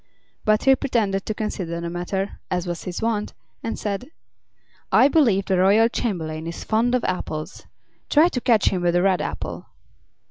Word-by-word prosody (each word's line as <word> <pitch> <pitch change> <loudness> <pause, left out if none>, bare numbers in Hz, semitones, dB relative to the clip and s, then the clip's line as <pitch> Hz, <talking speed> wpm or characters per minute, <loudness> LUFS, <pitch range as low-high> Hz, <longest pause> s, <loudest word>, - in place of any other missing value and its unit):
But 215 0 +3
he 270 0 +6
pretended 215 -8 -1
to 215 - -2
consider 180 -6 -3
the 170 - -4
matter, 190 +3 -3
as 180 -1 -1
was 175 -1 -5
his 180 +4 -4
wont, 220 -2 -1 0.3
and 225 - -4
said: 205 +5 -4 0.8
"I 260 - +6
believe 235 -11 +3
the 190 -2 +1
royal 205 +5 +5
chamberlain 160 -9 -3
is 170 - -6
fond 235 +3 +1
of 250 - 0
apples. 155 -4 -4 0.4
Try 305 +3 +6
to 250 - -3
catch 230 -4 +3
him 185 - -2
with 175 0 +1
a 175 - +3
red 190 -2 +2
apple." - - -5
195 Hz, 175 wpm, -23 LUFS, 175-230 Hz, 0.8 s, he